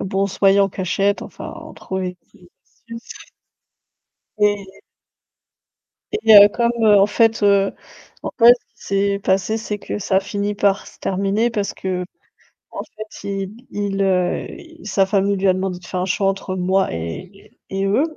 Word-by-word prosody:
Bon 195 0 -1
on - - +2
se 195 - -8
voyait 195 0 +5
en 195 - +3
cachette, 195 +2 -1
enfin - - -9
on - - -11
trouvait 185 -1 -5 0.2
des 175 - -19
excuses 230 -1 -12 1.4
et 205 -2 -1 1.3
et 425 - 0 0.2
heu, 205 0 +10
comme, 235 +3 0
heu, 210 -1 +6
en 195 - +5
fait, 225 +1 +2
heu 200 -1 +3 0.5
en - - -4
fait 240 0 +8
ce 245 - -18 0.2
qui 200 - 0 0.2
s'est - - -6
passé 190 +3 +1
c'est 215 -1 -4
que 205 - -5
ça 195 -1 0
a - - +4
finit 205 0 -3
par 200 -1 +1
se - - -15
terminer 200 +5 0
parce 205 -3 -3
qu'en 180 -1 -5 0.6
fait 215 -1 -11
il 195 +1 -4 0.2
il, 200 -1 -2
heu, 185 -2 +1
il 330 -4 -12
sa 195 -1 +2
famille 200 0 +1
lui 195 +1 +1
a 185 - +5
demandé 185 -1 -3
de 180 - -16
faire 180 0 -3
un - - -1
choix 195 +1 0
entre 195 -1 -2
moi 190 +1 +1
et 185 - -8
et 195 0 -2
eux. 205 +8 +2
195 Hz, 180 wpm, -20 LUFS, 190-210 Hz, 1.4 s, heu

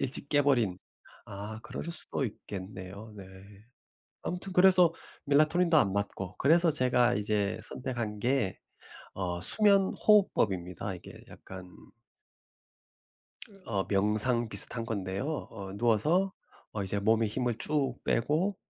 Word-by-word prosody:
일찍 135 +1 -2
깨 145 - +4
버린 120 -10 +1 0.5
아 105 +2 -7
그럴 - - -7
수도 155 -4 -2
있겠네요. 100 0 -8
네. 100 - -9 1.0
아무튼 180 +2 -5
그래서 180 -2 +5 0.3
멜라토닌도 155 +4 +3
안 100 -10 +3
맞고 100 -2 -4
그래서 165 +4 +4
제가 125 -4 +2
이제 105 -1 -1
선택한 120 -5 -5
게 120 -4 0 0.6
어 90 -2 -3
수면 200 - +4
호흡법입니다. 95 - +1
이게 - - -12
약간 90 -1 -11 1.9
어 100 -3 -1
명상 110 +4 +2
비슷한 115 +3 +1
건데요 105 +7 -3
어 100 -3 -8
누워서 150 - +2 0.4
어 105 - -3
이제 100 +1 -2
몸에 110 +2 +2
힘을 120 +2 -2
쭉 140 -4 -1
빼고 155 - 0
115 Hz, 245 characters per minute, -29 LUFS, 100-150 Hz, 1.9 s, 그래서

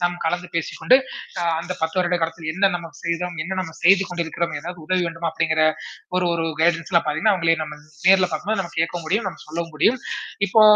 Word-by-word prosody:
நாம் 175 0 +1
கலந்து 175 +2 -1
பேசிக்கொண்டு, 170 +9 +3 0.4
அ - - -1 0.2
அந்த 175 +2 -4
10 160 +3 -1
வருட 180 0 +2
காலத்தில் 165 -1 -3
என்ன 195 +2 +3
நம்ம 170 -1 -4
செய்தோம்? 170 +1 -2
என்ன 190 +3 -4
நம்ம 165 -3 -6
செய்து 195 +3 +6
கொண்டிருக்கிறோம்? 170 -1 -2
எதாவது 170 +2 -8
உதவி 185 +1 +1
வேண்டுமா? 165 0 -3
அப்படிங்கிற 160 -1 +1 0.6
ஒரு 180 -1 +2
ஒரு 165 -1 -1 0.2
கைடன்ஸ்லாம் 170 +1 +2
பாத்தீங்கன்னா, 160 +8 +2
அவங்கள 165 -2 +3
நம்ம 150 0 -8 0.3
நேர்ல 190 -1 +6
பாக்கும்போது, 210 +1 -1
நம்ம 170 -2 -9
கேட்க 165 +2 0
முடியும், 200 +4 0
நம்ம 170 - -13
சொல்லவும் 165 +1 -4
முடியும். 240 - +3 0.5
இப்போ, 220 +4 +5
170 Hz, 190 wpm, -22 LUFS, 165-185 Hz, 0.6 s, செய்து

